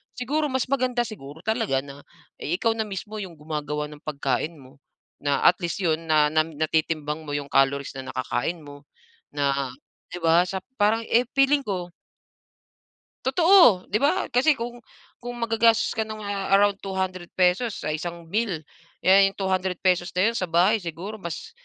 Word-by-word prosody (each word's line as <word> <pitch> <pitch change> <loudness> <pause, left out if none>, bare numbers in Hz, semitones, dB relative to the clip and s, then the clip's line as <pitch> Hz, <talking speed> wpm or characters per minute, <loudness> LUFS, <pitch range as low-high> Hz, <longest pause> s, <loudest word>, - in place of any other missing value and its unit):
siguro 295 +5 -1
mas 260 -1 0
maganda 255 -3 +1
siguro 145 -7 -10
talaga 220 - 0
na, 140 0 -12 0.3
eh, 170 - -2
ikaw 225 -1 +2
na 220 - 0
mismo 205 +2 -6
'yong 190 -5 -6
gumagawa 150 -1 -3
ng 150 0 -13
pagkain 145 +2 -1
mo. 130 0 -16 0.5
Na 145 -1 +1
at 180 - +6
least 170 - -2
'yon, 165 -2 0
na 155 -1 +4
nam 155 +1 +1
natitimbang 155 0 -1
mo 145 - -6
yong 145 -1 -4
calories 135 0 +2
na 130 - -6
nakakain 130 +6 -2
mo. 145 0 -12 0.5
Na, 140 -2 0 0.4
'di 175 - -4
ba, 165 +2 +5
sa 190 0 -4 0.2
parang, 215 +2 +3
eh, 240 +2 +4
feeling 275 +1 +4
ko. 180 -4 -3 1.4
Totoo. 325 - +6
'Di 215 - +2
ba 285 - +1
kasi 270 +5 +4
kung 240 0 -6 0.4
kung 245 0 -6
maggagastos 230 -1 +2
ka 220 -1 -2
ng, 215 -1 -7
ah, 200 -1 -3
around 205 0 +3
200 190 -2 -3
pesos 185 +5 +2
sa 155 - -3
isang 170 +2 -5
bill, 205 -7 -1 0.4
eh, 195 +1 +6
yung 195 - -6
200 190 -1 -1
pesos 180 -1 +2
na 200 +5 +3
'yon, - - -10
sa 185 - -2
bahay 180 +7 +3
siguro 185 +5 -6
mas, 170 - -6
185 Hz, 170 wpm, -25 LUFS, 155-220 Hz, 1.4 s, at